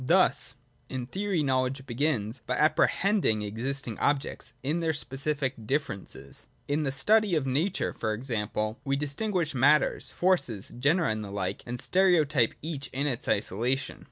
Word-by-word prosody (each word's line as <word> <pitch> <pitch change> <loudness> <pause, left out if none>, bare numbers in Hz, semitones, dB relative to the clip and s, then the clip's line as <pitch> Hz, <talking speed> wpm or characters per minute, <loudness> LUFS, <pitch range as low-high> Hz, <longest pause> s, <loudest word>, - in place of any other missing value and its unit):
Thus, - - +3 0.3
in 130 -2 -3
theory, 190 +2 -1
knowledge 130 0 0
begins 120 -3 -1
by 125 - 0
apprehending 155 - +3
existing 115 +3 -2
objects 140 -1 -1
in 150 +5 0
their 165 -1 +1
specific 135 -4 -2
differences. 100 - -3 0.2
In 145 +2 +1
the 140 -3 0
study 210 +7 +3
of 150 -4 +1
nature, 150 +9 0
for 110 - -2
example, 110 -1 -2
we 135 0 0
distinguish 155 +4 -1
matters, 140 +3 +4
forces, 175 - +1
genera 160 +6 +3
and 110 0 -2
the 100 - -7
like, 100 -2 -2
and 120 +1 -4
stereotype 155 - +3
each 150 -3 -4
in 135 +3 -1
its 130 -5 -2
isolation. 115 +6 0
135 Hz, 145 wpm, -28 LUFS, 120-155 Hz, 0.3 s, matters